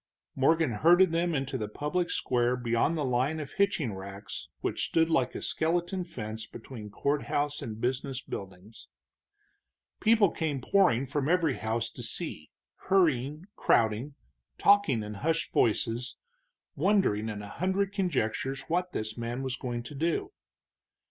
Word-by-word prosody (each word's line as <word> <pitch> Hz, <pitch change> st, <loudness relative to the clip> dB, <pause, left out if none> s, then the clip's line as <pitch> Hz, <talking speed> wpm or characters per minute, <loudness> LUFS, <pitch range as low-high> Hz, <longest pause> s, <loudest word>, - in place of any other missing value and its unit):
Morgan 160 Hz, +1 st, +3 dB
herded 170 Hz, -, +5 dB
them 170 Hz, 0 st, +1 dB
into 135 Hz, -1 st, -2 dB
the 105 Hz, -, -2 dB
public 150 Hz, +10 st, -2 dB
square 125 Hz, 0 st, +1 dB
beyond 120 Hz, +6 st, +1 dB
the 150 Hz, -, 0 dB
line 130 Hz, +5 st, +1 dB
of 145 Hz, -3 st, -6 dB
hitching 195 Hz, -, +1 dB
racks 95 Hz, +1 st, -7 dB
which -, -, -1 dB
stood 165 Hz, 0 st, +2 dB
like 130 Hz, -6 st, +1 dB
a -, -, -5 dB
skeleton 175 Hz, +3 st, 0 dB
fence 110 Hz, -9 st, -6 dB
between 110 Hz, -2 st, -9 dB
courthouse 145 Hz, +4 st, -1 dB
and 110 Hz, -1 st, -6 dB
business 130 Hz, +2 st, -1 dB
buildings. 95 Hz, -1 st, -9 dB, 1.1 s
People 215 Hz, -4 st, +4 dB
came 155 Hz, -4 st, -2 dB
pouring 135 Hz, -4 st, +3 dB
from 140 Hz, +1 st, -1 dB
every 170 Hz, -5 st, +3 dB
house 115 Hz, +2 st, -2 dB
to -, -, -9 dB
see, 115 Hz, -, -3 dB, 0.4 s
hurrying, 155 Hz, -4 st, +2 dB
crowding, 115 Hz, +6 st, +2 dB, 0.4 s
talking 200 Hz, -, +4 dB
in 105 Hz, 0 st, -6 dB
hushed 160 Hz, +10 st, -1 dB
voices, 115 Hz, +2 st, +1 dB, 0.6 s
wondering 150 Hz, -, +2 dB
in 105 Hz, -1 st, -5 dB
a -, -, -7 dB
hundred 190 Hz, -, -1 dB
conjectures 135 Hz, -, -1 dB
what 180 Hz, +2 st, -1 dB
this 110 Hz, +2 st, -4 dB
man 120 Hz, +3 st, -3 dB
was 130 Hz, -1 st, -2 dB
going 120 Hz, -3 st, -4 dB
to 120 Hz, -, -9 dB
do. 170 Hz, -, -1 dB
135 Hz, 140 wpm, -29 LUFS, 115-170 Hz, 1.1 s, herded